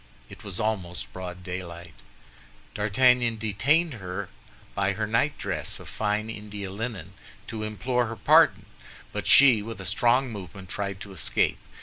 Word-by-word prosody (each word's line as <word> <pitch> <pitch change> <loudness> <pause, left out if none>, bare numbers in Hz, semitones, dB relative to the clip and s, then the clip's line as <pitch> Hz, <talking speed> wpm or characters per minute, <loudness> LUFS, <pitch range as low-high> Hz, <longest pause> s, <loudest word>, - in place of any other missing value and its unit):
It - - -12
was 100 -3 -5
almost 95 -5 -2
broad 90 -1 -7
daylight. 90 -2 -7 0.8
D'Artagnan 115 +3 +3
detained 135 - +2
her 95 -2 -5 0.4
by 100 0 +1
her 110 +2 -1
night 115 +7 +1
dress 90 -7 -3
of - - -11
fine 105 0 -1
India 105 -3 -6
linen, 100 -4 -5 0.3
to 110 -1 -5
implore 120 +3 0
her 115 - -5
pardon; - - +5 0.5
but - - -3
she, 130 -6 +7
with 110 0 -7
a 95 - -7
strong 120 +6 +2
movement, 95 -2 -8
tried 100 -1 -4
to 100 -1 -8
escape. 80 -4 0
105 Hz, 145 wpm, -26 LUFS, 95-115 Hz, 0.8 s, she